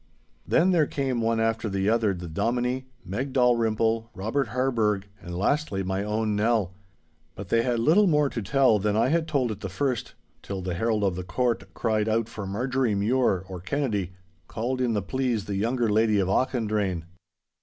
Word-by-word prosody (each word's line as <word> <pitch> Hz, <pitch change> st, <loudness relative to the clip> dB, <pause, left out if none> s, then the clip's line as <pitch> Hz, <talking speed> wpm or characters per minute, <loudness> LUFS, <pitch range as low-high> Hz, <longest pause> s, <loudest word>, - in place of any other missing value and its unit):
Then 180 Hz, +3 st, +4 dB
there 160 Hz, -5 st, +3 dB
came 130 Hz, -4 st, -1 dB
one 115 Hz, 0 st, +1 dB
after 115 Hz, 0 st, 0 dB
the 95 Hz, 0 st, -1 dB
other 110 Hz, -1 st, +3 dB
the 90 Hz, -1 st, -7 dB
Dominie, 125 Hz, +9 st, -1 dB, 0.2 s
Meg 125 Hz, +9 st, -3 dB
Dalrymple, 115 Hz, -2 st, +2 dB
Robert 110 Hz, +9 st, -1 dB
Harburgh, 110 Hz, -4 st, 0 dB, 0.2 s
and 85 Hz, 0 st, -6 dB
lastly 105 Hz, -1 st, 0 dB
my 95 Hz, +1 st, -2 dB
own 105 Hz, 0 st, -1 dB
Nell. 105 Hz, -3 st, +1 dB, 0.6 s
But 95 Hz, -1 st, -8 dB
they 115 Hz, -, +3 dB
had 120 Hz, 0 st, 0 dB
little 165 Hz, -, +4 dB
more 150 Hz, -3 st, +3 dB
to 120 Hz, -, -4 dB
tell 115 Hz, +1 st, +3 dB
than 105 Hz, +1 st, 0 dB
I 115 Hz, +3 st, +3 dB
had 165 Hz, +1 st, +1 dB
told 135 Hz, -7 st, 0 dB
at 105 Hz, -, -6 dB
the 95 Hz, -, -5 dB
first, 125 Hz, +5 st, -2 dB, 0.3 s
till 95 Hz, -2 st, -5 dB
the 90 Hz, -1 st, -2 dB
herald 110 Hz, +3 st, 0 dB
of 95 Hz, -3 st, +1 dB
the 90 Hz, -, -4 dB
court 120 Hz, +6 st, -1 dB
cried 110 Hz, -2 st, 0 dB
out 110 Hz, 0 st, +1 dB
for 105 Hz, -4 st, -7 dB
Marjorie 125 Hz, +2 st, 0 dB
Mure, 100 Hz, -3 st, +1 dB
or 95 Hz, -1 st, -7 dB
Kennedy, 100 Hz, -4 st, -2 dB, 0.3 s
called 125 Hz, +3 st, -2 dB
in 120 Hz, -2 st, +1 dB
the 105 Hz, -3 st, -1 dB
pleas 125 Hz, -4 st, -1 dB
the 100 Hz, -, -4 dB
younger 115 Hz, +4 st, 0 dB
lady 110 Hz, 0 st, +3 dB
of 95 Hz, -2 st, +1 dB
Auchendrayne. 105 Hz, -5 st, 0 dB
115 Hz, 185 wpm, -26 LUFS, 100-125 Hz, 0.6 s, Then